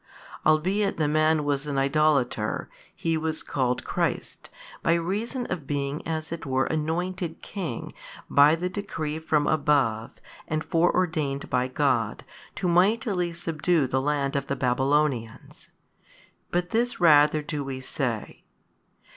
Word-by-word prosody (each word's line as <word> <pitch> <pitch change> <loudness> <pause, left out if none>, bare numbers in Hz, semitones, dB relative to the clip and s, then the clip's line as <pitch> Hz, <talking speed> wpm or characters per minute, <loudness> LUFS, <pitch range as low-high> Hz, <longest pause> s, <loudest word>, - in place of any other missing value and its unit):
Albeit 190 +6 +2
the 155 -2 +1
man 155 0 +3
was 145 0 -1
an 140 -2 -2
idolater, 135 -5 +1 0.2
he 165 -1 0
was 160 0 -3
called 125 -2 -1
christ, - - -3 0.3
by 165 - +3
reason 210 +9 -2
of 165 -7 -4
being 140 0 -2
as 160 -1 -3
it 165 - -5
were 130 -1 +1
anointed 165 +2 -2
king 170 - -5 0.3
by 145 +2 +6
the 175 +2 -2
decree 165 -6 -4
from 155 -2 +1
above 140 -8 +1 0.4
and 155 0 -1
fore 170 -1 +2
ordained 155 -6 -1
by 125 0 +2
God 130 -5 0 0.3
to 185 - -2
mightily 185 0 +2
|186 - - -11
subdue 165 -2 +1
the 130 +1 0
land 140 -1 0
of 140 -1 -1
the 140 - -1
Babylonians: 130 -2 -1 0.8
but 175 0 -1
this 240 +2 0
rather 150 -2 +5
do 150 -1 -3
we 135 -1 -5
say 130 -4 -3
2. - - -35
155 Hz, 140 wpm, -26 LUFS, 140-170 Hz, 0.8 s, by